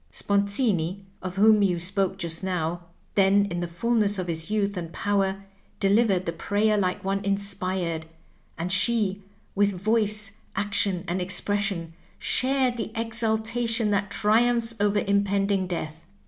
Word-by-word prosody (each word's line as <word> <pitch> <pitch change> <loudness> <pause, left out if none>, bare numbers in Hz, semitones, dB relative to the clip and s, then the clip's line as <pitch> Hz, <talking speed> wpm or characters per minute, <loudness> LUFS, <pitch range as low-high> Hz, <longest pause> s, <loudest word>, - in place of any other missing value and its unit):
Sponzini, 200 - 0 0.2
of 185 -1 -5
whom 210 +1 +5
you 180 -4 +2
spoke 190 +1 -1
just 165 -3 -4
now, 175 -2 -2 0.3
then 200 0 +4
in 175 - -2
the 175 - -2
fullness 205 +3 +1
of 185 - -2
his 165 +1 -4
youth 205 -1 0
and 170 -2 -5
power, 195 0 0 0.4
delivered 195 -2 +3
the 170 - -1
prayer 205 +6 +1
like 190 0 -1
one 195 +1 -1
inspired, 185 -4 -2 0.5
and 175 +3 -3
she, 200 0 +2 0.3
with 205 0 +2
voice, 210 +1 +1 0.2
action, 200 -2 0
and 180 +2 -1
expression, 190 -2 -1 0.2
shared 260 -1 +1
the 225 - -4
exaltation 225 0 0
that 200 0 0
triumphs 230 +3 +2
over 205 0 +2
impending 200 -1 +1
death. 160 -3 -5
200 Hz, 135 wpm, -26 LUFS, 185-210 Hz, 0.5 s, whom